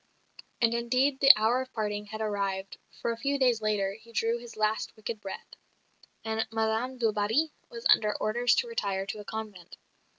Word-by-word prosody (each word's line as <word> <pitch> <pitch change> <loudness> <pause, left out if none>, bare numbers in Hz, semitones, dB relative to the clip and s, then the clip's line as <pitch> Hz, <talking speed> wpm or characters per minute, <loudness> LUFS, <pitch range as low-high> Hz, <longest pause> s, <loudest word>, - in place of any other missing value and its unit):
And, 230 -1 +3
indeed, 255 +4 +1
the 275 0 +10
hour 225 +4 +2
of 260 0 -8
parting 210 -2 -3
had 215 +1 -6
arrived; 195 -2 -2 0.2
for 235 - -1
a 230 - -4
few 280 +4 0
days 250 -4 +2
later 205 -2 0
he 225 +2 -15
drew 230 +1 0
his 235 -2 -11
last 215 0 0
wicked 215 0 -6
breath, 195 - -8 0.7
and 220 0 -1
Madame 225 +3 -1
du 230 -3 +2
Barry 220 +10 +1 0.2
was 470 0 -9
under 210 -1 +4
orders 240 +3 +2
to 475 - 0
retire 200 - -2
to 210 - -5
a - - -7
convent. 210 -5 -7
220 Hz, 185 wpm, -29 LUFS, 210-245 Hz, 0.7 s, the